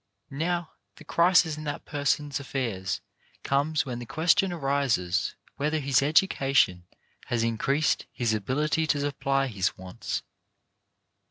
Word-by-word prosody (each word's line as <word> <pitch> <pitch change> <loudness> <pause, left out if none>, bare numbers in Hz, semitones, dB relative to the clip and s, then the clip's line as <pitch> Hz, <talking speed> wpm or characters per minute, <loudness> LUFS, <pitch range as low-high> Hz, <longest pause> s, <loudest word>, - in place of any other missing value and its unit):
Now, 170 +3 -1 0.2
the - - -14
crisis 170 -1 +3
in - - -7
that 145 0 -4
person's 145 -1 -1
affairs 115 -8 -3 0.4
comes 150 +3 +1
when 125 -3 -4
the 120 - -8
question 180 - +2
arises 135 - 0 0.2
whether 150 +2 0
his 140 -3 +2
education 135 - +2 0.4
has 115 -2 0
increased 135 +7 +1
his 115 -3 0
ability 150 +9 0
to 145 - +1
supply 135 -1 0
his 100 -7 -1
wants. 95 0 -5
140 Hz, 120 wpm, -27 LUFS, 120-155 Hz, 0.4 s, crisis